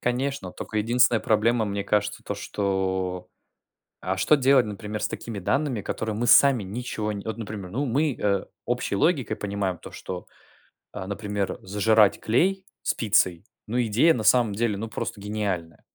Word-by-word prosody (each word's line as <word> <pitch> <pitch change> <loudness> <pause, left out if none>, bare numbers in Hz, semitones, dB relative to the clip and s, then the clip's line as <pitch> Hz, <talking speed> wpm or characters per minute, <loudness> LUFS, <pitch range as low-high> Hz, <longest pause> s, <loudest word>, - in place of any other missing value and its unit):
Конечно, 125 -5 -2
только 110 - -4
единственная 120 +1 +3
проблема, 110 +1 +2
мне 100 -1 -2
кажется, 105 0 0
то, - - -3
что: 95 -2 -2 0.7
а 95 +2 -1
что 150 - +4
делать 135 -2 +4
например 105 +1 -5
с - - +2
такими 110 -4 -6
данными, 130 +2 0
которые 110 +2 -3
мы 120 +2 -1
сами 135 -7 +6
ничего 110 +2 -4
Вот, 105 +1 -4
например, 100 -4 -6
ну, 140 +7 -1
мы, 140 +3 +1
э, 100 -2 +1 0.2
общей - - -1
логикой 125 - +1
понимаем 100 -3 -2
то, - - -11
что, 90 -1 -7 0.7
а, 95 - -6
например, 100 -1 -3
зажирать 105 +1 +3
клей 190 - +1 0.2
с - - +1
пиццей, 95 -5 +2 0.2
ну, 120 +3 0
идея 120 +9 +4
на 110 - -3
самом 115 -2 +4
деле, 105 -1 0
ну, 115 +2 -4
просто 105 - -4
гениальная. 100 -6 -3
105 Hz, 160 wpm, -25 LUFS, 100-120 Hz, 0.7 s, сами